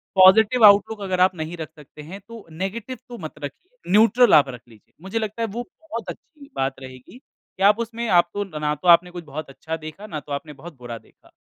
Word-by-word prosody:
Positive 215 +5 +6
outlook 205 +1 +5
अगर 185 -2 -2
आप 185 0 +4
नहीं 160 +1 -6
रख 160 -2 -6
सकते 150 0 -14
हैं 170 +7 -9
तो 230 -2 -11
नेगेटिव 205 +9 -5
तो 240 - -8
मत 155 -6 -8
रखिए। 370 - -9
न्यूट्रल 230 +4 +5
आप 145 -2 +6
रख 125 -2 -9
लीजिए। 110 -3 -21
मुझे 195 +5 -3
लगता 215 +1 -4
है 230 - 0
वो 230 +4 -5 0.2
बहुत 315 -8 -7
अच्छी 290 -3 -12
बात 135 0 -2
रहेगी 130 - -12
कि 195 - -11
आप 205 +3 +5
उसमें 235 0 -4
आप 175 -2 +4
तो 205 - -2 0.2
ना 150 0 0
तो 150 +5 -7
आपने 175 +1 +6
कुछ 175 -1 -8
बहुत 150 0 -7
अच्छा 160 +4 -6
देखा 155 +6 -10
ना 155 -7 -5
तो 145 - -14
आपने 140 +1 -5
बहुत 155 +2 -12
बुरा 120 -2 -7
देखा। - - -23
185 Hz, 225 wpm, -22 LUFS, 150-225 Hz, 0.2 s, Positive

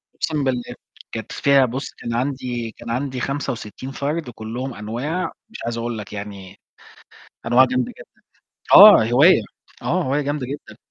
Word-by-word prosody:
أُقسم 150 -3 -2
بالله. 125 -2 -2 0.4
كانت - - -6
فيها 140 -1 +4
بُص، 130 +3 -5
كان 115 - -6
عندي 125 -2 -3
كان 120 +1 -11
عندي 130 +2 -2
65 130 -2 -4
فرد 145 +1 -3
كلّهم 120 +3 -6
أنواع، 120 - -3 0.2
مش 235 - -10
عايز 115 0 -3
أقول 115 -1 -3
لك 105 0 -8
يعني، 100 -2 -8 0.9
أنواع 120 +2 +6
جامدة 125 -1 -1
جدًا. - - -17 0.5
آه، 110 - +10
هواية. 125 +5 +5 0.4
آه، - - 0
هواية 135 +3 0
جامدة 145 -2 -3
جدًا. 145 +3 -8
125 Hz, 150 wpm, -21 LUFS, 115-140 Hz, 0.9 s, آه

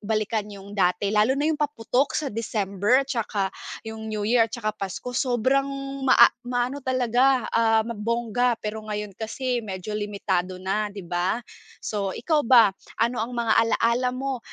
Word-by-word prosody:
balikan 215 0 -1
yung 200 -1 -11
dati 195 +1 +1
lalo 215 +5 +3
na 290 - 0
yung 310 -1 0
paputok 275 -2 0
sa 295 -3 -1
December 210 +3 +1
tsaka 210 -7 -2 0.3
yung 220 0 -7
New 210 -1 -3
Year 230 0 +3
at 225 - -37
saka 215 -3 -2
Pasko 200 +6 -5
sobrang 260 +2 +1 0.4
maa 235 -2 +7 0.2
maano 250 +3 -1
talaga, 255 -1 +2
ah, 225 -1 +3
mabongga, 235 +2 0
pero 215 +1 -3
ngayon 210 -1 -5
kasi 245 +4 -3
medyo 190 0 -6
limitado 200 -3 -2
na, 210 +3 0
di 200 -1 -8
ba? 175 +6 -1 0.4
So, 200 -3 -2
ikaw 305 -6 0
ba 230 -5 +7 0.2
ano 235 +2 0
ang 235 +3 -3
mga 230 -2 +2 0.2
alala 245 +2 +1
mo 265 0 -3
225 Hz, 155 wpm, -25 LUFS, 210-250 Hz, 0.4 s, maa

